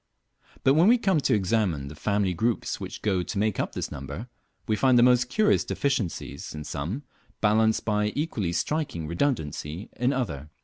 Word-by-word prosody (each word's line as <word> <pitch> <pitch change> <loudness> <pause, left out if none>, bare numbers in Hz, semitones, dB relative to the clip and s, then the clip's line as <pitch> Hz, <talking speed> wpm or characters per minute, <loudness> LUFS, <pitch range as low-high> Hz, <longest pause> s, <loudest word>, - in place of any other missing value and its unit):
But 135 - +5
when 165 +6 +5
we 240 +3 +6
come 190 -8 +2
to 135 - +2
examine 95 -8 0
the 70 - -8
family 100 +3 0
groups 115 +7 -1
which - - -7
go 95 -4 +1
to 90 - -5
make 105 0 0
up - - -2
this - - -4
number, 70 - -7 0.4
we 110 - +2
find 130 +2 +4
the 120 - +6
most 125 0 +4
curious 210 +8 +3
deficiencies 105 - -2
in 75 - -5
some, 80 - -4 0.4
balanced 110 +1 +3
by 105 -1 +1
equally 125 - -1
striking 85 - -2
redundancy 85 - -2
in 125 +2 +1
other. 75 - -3
105 Hz, 175 wpm, -26 LUFS, 85-125 Hz, 0.4 s, we